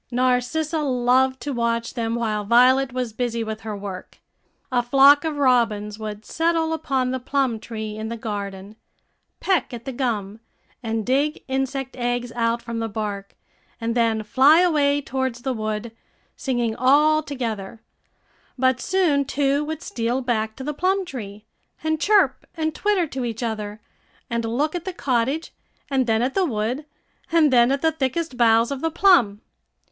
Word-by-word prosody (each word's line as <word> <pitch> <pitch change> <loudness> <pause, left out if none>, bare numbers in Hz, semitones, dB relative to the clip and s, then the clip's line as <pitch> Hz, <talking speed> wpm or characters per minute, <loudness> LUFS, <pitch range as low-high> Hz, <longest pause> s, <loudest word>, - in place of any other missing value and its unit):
Narcissa 255 +6 0
loved 260 -1 +2
to 290 - -3
watch 235 -1 -1
them 230 -2 -2
while 215 -3 -1
Violet 255 +4 +4
was 250 -3 -3
busy 235 -1 -2
with 220 0 -5
her 215 -2 -5
work. 195 -2 -8 0.5
A 245 -1 +2
flock 275 +4 +6
of 315 -2 -2
robins 225 -6 +1
would 215 0 -6
settle 325 0 0
upon 270 -5 -1
the 260 - -2
plum 255 -3 0
tree 220 -1 -6
in 220 0 -4
the 230 - -4
garden, 200 -2 -6 0.6
peck 350 -10 0
at 235 - -10
the 270 - -3
gum, 225 -5 -3 0.4
and 225 -2 -2
dig 280 +4 0
insect 270 0 -2
eggs 245 -1 -2
out 230 0 -1
from 230 -1 -4
the 225 0 -2
bark, 200 -2 -5 0.4
and 230 0 -2
then 225 -2 +1
fly 270 +9 +5
away 290 -5 +2
towards 260 -3 -3
the 265 - -1
wood, 215 0 -3 0.4
singing 240 -4 -1
all 300 +4 +4
together; 230 -8 -5 0.8
but 260 0 +2
soon 355 -7 +2
two 280 +1 0
would 315 +2 -5
steal 235 +2 -2
back 220 -3 -1
to 265 - -8
the 300 +2 -3
plum 375 +5 0
tree, 210 - -8 0.4
and 315 0 -1
chirp 415 -1 +3
and 315 -1 -1
twitter 410 -2 +1
to 265 -4 -5
each 230 0 -4
other, 215 -2 -4 0.5
and 235 0 -1
look 275 +7 0
at 350 -2 -4
the 375 - -4
cottage, 270 +2 -1 0.4
and 260 -2 +1
then 225 +1 +2
at 260 +2 -1
the 390 - +2
wood, 250 +1 -2 0.4
and 315 -5 +4
then 240 +1 +5
at 275 +2 -1
the 320 - +4
thickest 305 0 -2
boughs 230 0 +4
of 275 -1 -4
the 325 - +1
plum. 310 - +4
250 Hz, 165 wpm, -23 LUFS, 225-285 Hz, 0.8 s, flock